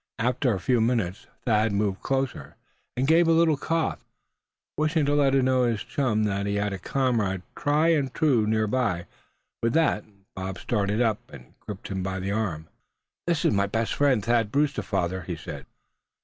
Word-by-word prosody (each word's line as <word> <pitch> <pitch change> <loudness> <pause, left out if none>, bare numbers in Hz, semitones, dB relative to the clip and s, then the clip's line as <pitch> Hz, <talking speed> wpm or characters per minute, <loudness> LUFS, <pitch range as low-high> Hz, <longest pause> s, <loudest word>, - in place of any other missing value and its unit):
After 125 +2 +1
a 100 - -1
few 120 +6 +2
minutes 110 -6 -1 0.2
Thad 110 -2 +2
moved 100 -1 -1
closer, 135 -1 -2 0.4
and 130 - +1
gave 165 +3 +5
a - - +4
little 165 -1 +4
cough, 165 +3 -1 0.7
wishing 155 0 +1
to 145 - +1
let 140 -2 +3
his 125 -4 +2
chum 115 -6 0
know 105 - +1
that 100 +1 -2
he 100 - -1
had 100 0 -1
a 95 - -5
comrade 110 -6 0
tried 150 +3 +2
and 140 -4 0
true 130 -9 +2
near 110 0 +2
by. 105 -7 0 0.6
With 115 0 +1
that 160 -9 +2 0.3
Bob 95 -1 -4
started 105 +1 0
up, 110 -3 +1
and 60 - -13
gripped 105 -2 -8
him 95 -1 -3
by 95 0 -3
the 95 +1 -3
arm. 95 -8 -2 0.6
"This 170 -3 +1
is - - +4
my 100 0 +2
best 115 +2 -1
friend, 130 -8 +2
Thad 115 -2 +2
Brewster, 145 +2 +1
father," 95 -2 -2
he 90 0 -5
said. 80 - -8
115 Hz, 180 wpm, -26 LUFS, 100-135 Hz, 0.7 s, gave